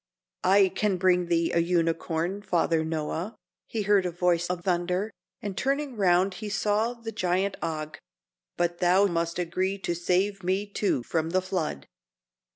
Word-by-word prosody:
"I 195 +1 +5
can 200 0 0
bring 180 -1 +3
thee 170 -1 +1
a 170 - +3
unicorn, 170 +2 0
Father 170 -4 +1
Noah," 160 +6 -3 0.3
he 220 -2 -2
heard 200 -2 +3
in - - -1
a - - -21
voice 175 -1 +2
of 180 -1 -3
thunder, 180 +3 0 0.3
and 200 -2 -4
turning 275 +1 -1
round 185 -1 +3
he 215 - -4
saw 210 +3 0
the 230 -1 -7
giant, 190 -1 0
Og. 155 -1 -4 0.6
"But 175 0 0
thou 185 +2 +4
must 170 -2 -1
agree 185 +3 -1
to 180 -3 -2
save 185 +3 0
me, 190 +3 0
too, 200 - -1
from 160 +4 -1
the 185 +2 +2
flood." 175 - -3
180 Hz, 165 wpm, -27 LUFS, 170-200 Hz, 0.6 s, I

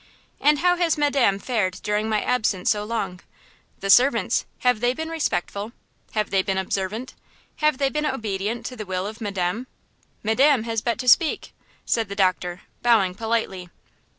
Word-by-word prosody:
"And 295 +2 +4
how 355 +3 +3
has 340 -3 +1
madame 280 -9 +2
fared 200 -5 -1
during 210 +1 0
my 215 -1 +1
absence 215 -7 +1
so 210 -1 0
long? 210 -5 -3 0.6
The 195 - -3
servants–have 250 -1 +3
they 245 +2 +1
been 320 +2 -4
respectful? 220 - -2 0.4
Have 215 -1 -1
they 195 -1 +3
been 190 0 -2
observant? 195 +6 -3 0.4
Have 305 -3 +2
they 275 -1 +1
been 300 0 -1
obedient 220 -3 -3
to 255 - -5
the 215 -4 -7
will 185 0 -2
of 215 +3 -7
madame? 200 +3 -2 0.6
Madame 250 +3 +3
has 225 -1 -2
but 235 0 -1
to 250 +1 -5
speak!" 315 +5 +3 0.3
said 225 -3 0
the 200 - -5
doctor, 185 -2 0 0.2
bowing 220 -6 +3
politely. 215 -4 -2
220 Hz, 160 wpm, -23 LUFS, 195-255 Hz, 0.6 s, And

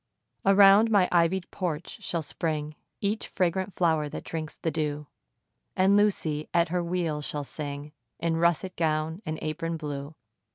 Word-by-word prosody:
Around 200 +2 +7
my 200 -4 +4
ivy'd 175 +1 +2
porch 170 -3 -4
shall 170 -2 -2
spring 150 0 -3 0.3
Each 210 +2 -1
fragrant 185 +1 -1
flower 160 -4 +2
that - - -6
drinks 155 -2 -5
the 165 - -2
dew; 150 -1 -2 0.7
And 190 +2 +4
Lucy, 165 -7 +1
at 170 -1 +4
her 175 +1 0
wheel, 170 -3 -1
shall 145 0 -3
sing 145 0 -6 0.3
In 165 -1 0
russet 170 +2 +1
gown 160 +2 0
and 155 0 -2
apron 165 +2 -2
blue. 145 -1 -6
165 Hz, 150 wpm, -27 LUFS, 155-180 Hz, 0.7 s, Around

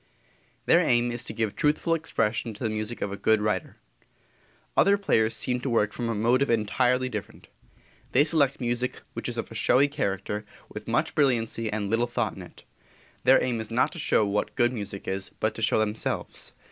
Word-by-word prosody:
Their - - +5
aim 120 0 +2
is 120 0 -2
to - - -3
give 110 -3 -2
truthful 150 +3 +1
expression 115 -8 -1
to 115 - -8
the 110 - 0
music 110 +2 -3
of 100 - -3
a - - -3
good 110 +2 +2
writer. 105 -4 -2 1.0
Other 200 +1 +5
players 110 - +1
seem 125 +3 -1
to 130 - -3
work 105 -3 +1
from 120 -1 -3
a 115 - -1
motive 125 +6 +2
entirely 125 +3 +2
different. 105 -5 -7 0.6
They 135 - +5
select 145 -3 +2
music 120 0 -2
which - - -4
is - - -5
of - - -4
a - - -7
showy 140 +3 +3
character, 105 -7 -3 0.3
with - - -9
much - - 0
brilliancy 115 -5 +1
and 105 -1 -2
little 115 +3 +1
thought 120 -3 -2
in 95 - -9
it. 90 - -13 0.6
Their 130 +1 +6
aim 120 -3 -1
is 110 - -5
not 115 +2 +2
to - - -8
show 110 - +2
what 105 +1 -1
good 120 +1 +2
music 100 -4 -6
is, 95 +1 -3
but 110 - 0
to - - -8
show 110 - +3
themselves. 110 0 -2
115 Hz, 195 wpm, -26 LUFS, 105-125 Hz, 1.0 s, Their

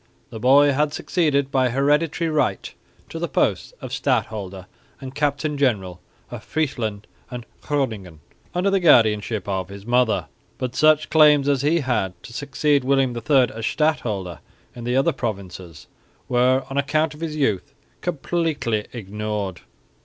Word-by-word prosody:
The 110 - -7
boy 140 +4 +5
had 145 +2 0
succeeded 145 -4 0
by 130 -2 +2
hereditary 150 +5 +1
right 150 -11 -1 0.3
to - - -7
the - - -2
posts - - 0
of - - -7
stadholder 95 -3 -2 0.3
and 135 -1 -8
captain 145 +1 -1
general 95 -10 0 0.3
of - - -7
Friesland 115 -9 -2 0.2
and 120 -2 -7 0.2
Groningen 110 - -3 0.4
under 185 +3 +1
the 195 - +3
guardianship 110 - +3
of 95 -2 -2
his 100 0 -10
mother, 120 -2 +2 0.3
but 125 -1 -4
such 155 0 +3
claims 150 -3 +5
as 140 -3 +2
he 155 +4 +2
had 120 -8 -1
to 115 - -11
succeed 145 +1 0
William 135 -2 +1
III 125 +2 +2
as 110 0 -3
stadholder 105 - -1 0.4
in 120 -1 -8
the 125 +1 0
other 135 - +3
provinces 95 - -6 0.4
were, 125 +1 +2
on 135 +1 -2
account 155 +2 0
of 150 - -14
his 160 -2 -3
youth, 120 -11 -1 0.3
completely 150 -9 -1
ignored. 105 -3 -4
130 Hz, 145 wpm, -22 LUFS, 105-145 Hz, 0.4 s, boy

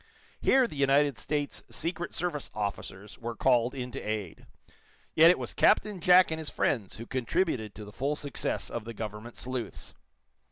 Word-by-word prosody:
Here 265 -1 +5
the 230 - -7
United 140 -1 +3
States 145 -1 -2
Secret 170 +1 -3
Service 165 -5 -3
officers 100 -1 -5
were 120 0 -5
called 125 +1 +2
in 125 -1 -5
to 135 - -6
aid, 105 -6 -5 0.7
yet 165 +1 +8
it 180 - +5
was - - -5
Captain 210 -3 +3
Jack 180 0 +6
and 160 - -2
his 155 - -3
friends 110 -8 -1
who 115 - -7
contributed 130 - -1
to 105 - -8
the 105 - -11
full 140 +7 -1
success 145 -1 -3
of 120 - -4
the 115 0 -7
government 110 +2 -7
sleuths. 125 -2 -5
130 Hz, 170 wpm, -29 LUFS, 110-160 Hz, 0.7 s, yet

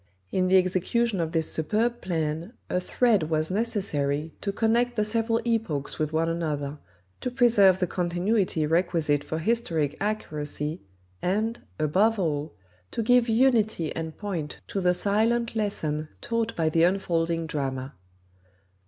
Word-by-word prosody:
In 185 0 +1
the 190 +1 +5
execution 190 +4 +1
of 165 -1 -1
this 160 -1 -1
superb 220 +9 0
plan 165 +2 -2 0.2
a 180 - +2
thread 200 -3 +2
was 155 +1 0
necessary 165 -9 -1
to 200 - -1
connect 235 +3 +1
the 215 - +2
several 225 +1 +1
epochs 220 -12 -1
with 155 -1 0
one 160 +1 +1
another, 150 -3 -2 0.4
to 250 - -2
preserve 230 -7 +5
the 185 - +1
continuity 180 0 0
requisite 160 -3 +1
for 160 - -4
historic 165 -6 0
accuracy, 155 -6 -3 0.4
and, 215 +6 0 0.2
above 195 +9 +2
all, 155 -4 -2 0.3
to 230 - -2
give 245 +1 +4
unity 220 - +2
and 160 -1 -5
point 175 -8 -4
to 195 - -2
the 180 0 +3
silent 230 +5 +1
lesson 155 -8 -1
taught 230 -1 -2
by 165 -1 +1
the 165 +1 +2
unfolding 170 -2 +1
drama. 135 -3 -3
180 Hz, 140 wpm, -26 LUFS, 155-220 Hz, 0.4 s, the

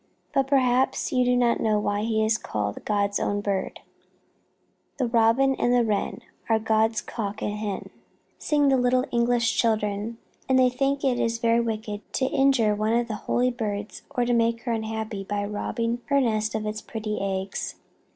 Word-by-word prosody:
But 270 -1 +2
perhaps 260 -2 +2
you 250 -1 +3
do 250 0 +2
not 240 -1 +2
know 215 -1 +2
why 205 0 -1
he 220 0 +1
is 220 0 +1
called 105 -1 -3
God's 200 -1 +1
own 205 - 0
bird. 200 -2 -2 1.2
"The 260 - +1
Robin 235 +3 +3
and 245 - 0
the 240 -1 +3
Wren 210 -2 -1 0.3
Are 225 - +4
God's 220 0 +1
cock 210 -3 -5
and 205 - -1
hen," 210 -2 -4 0.5
sing 290 -2 +2
the 265 - +4
little 250 +1 +2
English 235 -1 +2
children, 215 0 0 0.3
and 260 - +4
they 255 -1 +5
think 275 +2 0
it 255 -3 +1
is 230 0 0
very 230 0 +2
wicked 220 -2 -3
to 260 - +1
injure 265 -6 +3
one 215 +2 0
of 235 0 +1
the 225 - -4 0.2
holy 250 +1 +2
birds 210 -3 -4
or 250 -4 0
make 230 -1 +1
her 240 - -2
unhappy 220 -2 -3
by 205 +1 -2
robbing 230 +3 -2
her 280 0 +2
nest 220 -4 0
of 215 -1 -2
its 215 0 -3
pretty 215 -2 -4
eggs. 195 0 -3
225 Hz, 180 wpm, -25 LUFS, 210-245 Hz, 1.2 s, they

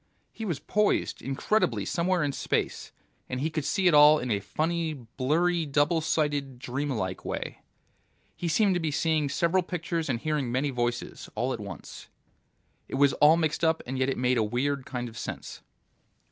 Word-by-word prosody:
He 225 - -6
was 170 -8 -1
poised 210 +6 0
incredibly 135 - 0
somewhere 175 - +1
in 145 - 0
space, - - -2 0.4
and 130 - -3
he 155 +4 -1
could 155 -1 -2
see 190 +6 0
it 175 - +6
all 150 +1 +8
in 125 -4 -3
a 100 - +2
funny, 160 - -1
blurry 150 +8 0
double 145 +4 +2
sighted, 145 -4 -1
dream 130 +4 -3
like 95 -8 -3
way. - - -4 0.8
He 175 - -3
seemed 195 +4 +3
to 175 - +1
be 160 -2 -1
seeing 155 0 +1
several 170 +6 +2
pictures 170 -3 -3
and 120 -3 0
hearing 150 -3 -1
many 135 +3 0
voices, 120 -1 -3
all 125 +4 0
at - - -5
once. 100 -2 -9 0.8
It - - -5
was 140 0 +4
all 155 +2 +6
mixed 160 0 -1
up, 160 0 +2
and 130 +1 -4
yet 130 +1 +2
it 135 - -1
made 125 -1 +2
a - - +3
weird 130 +5 -1
kind 125 -2 -4
of 115 +1 -9
sense. - - -6
145 Hz, 185 wpm, -28 LUFS, 130-165 Hz, 0.8 s, all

